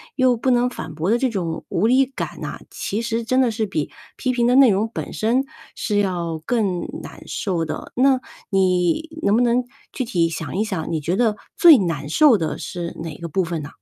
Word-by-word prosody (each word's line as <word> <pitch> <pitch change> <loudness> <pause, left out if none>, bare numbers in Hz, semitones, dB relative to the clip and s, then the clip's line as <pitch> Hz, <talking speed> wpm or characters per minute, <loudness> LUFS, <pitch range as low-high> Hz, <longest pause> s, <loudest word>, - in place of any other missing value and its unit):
又 255 -2 +3
不 250 +3 -1
能 245 0 +3
反 160 -10 -7
驳 170 +7 0
的 235 - +3
这 260 - +1
种 175 -7 -3
无 175 - +1
力 260 +3 +4
感 265 - -6
呐， - - -5
其 220 +4 -3
实 230 0 -1
真 255 +3 +1
的 245 -3 +3
是 220 -1 -2
比 155 -6 -3 0.3
批 255 - 0
评 240 -1 +2
的 250 - +4
内 265 -5 +7
容 210 +4 0
本 - - -5
身， 245 +5 +1 0.3
是 205 -2 0
要 170 -5 -1
更 200 -7 0 0.2
难 - - -10
受 180 -6 -2
的。 160 - -5
那 260 +1 +4 0.3
你 185 - +2
能 205 - +3
不 235 - +3
能 245 +1 +2 0.3
具 260 - -2
体 175 -8 +1
想 165 +1 -5
一 210 - +2
想， 190 -8 -3
你 160 - 0
觉 170 +5 -1
得 220 -2 +2 0.2
最 330 -6 +8
难 160 -7 -2
受 260 - +5
的 160 - -2
是 170 -1 -6
哪 160 -3 -6
个 170 - -5
部 185 +4 +1
分 165 -2 -3
呢？ 145 - -7
210 Hz, 235 characters per minute, -21 LUFS, 170-245 Hz, 0.3 s, 最